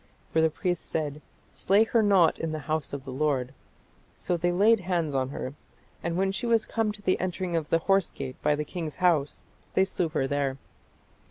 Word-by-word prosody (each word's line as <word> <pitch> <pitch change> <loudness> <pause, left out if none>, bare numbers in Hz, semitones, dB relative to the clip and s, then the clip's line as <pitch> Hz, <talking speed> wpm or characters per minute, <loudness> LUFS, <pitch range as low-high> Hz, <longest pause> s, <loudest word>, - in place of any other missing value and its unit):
For 160 - +4
the 160 - +4
priest 175 +2 -2
said, 150 -2 -2 0.3
Slay 200 +3 +4
her 225 0 +2
not 195 -5 +4
in 165 - -2
the 155 - -2
house 155 0 -2
of 140 -1 -6
the 135 - -6
Lord. 130 -2 0 0.6
So 175 - -1
they 175 +1 +1
laid 210 +5 +4
hands 175 -5 -1
on 130 -1 0
her; 130 -1 -5 0.5
and 170 0 -2
when 190 +1 +2
she 215 +5 -3
was 230 -1 +3
come 225 -2 0
to 205 -1 -14
the 185 - +2
entering 185 -1 -2
of 160 -2 -1
the 165 - +4
horse 195 +3 +2
gate 130 -2 -7
by 150 - +3
the 150 +1 -3
king's 160 -3 -5
house, 165 -6 +1 0.3
they 190 - +5
slew 180 -3 -1
her 135 - 0
there. 140 -1 -1
165 Hz, 205 wpm, -27 LUFS, 145-190 Hz, 0.6 s, they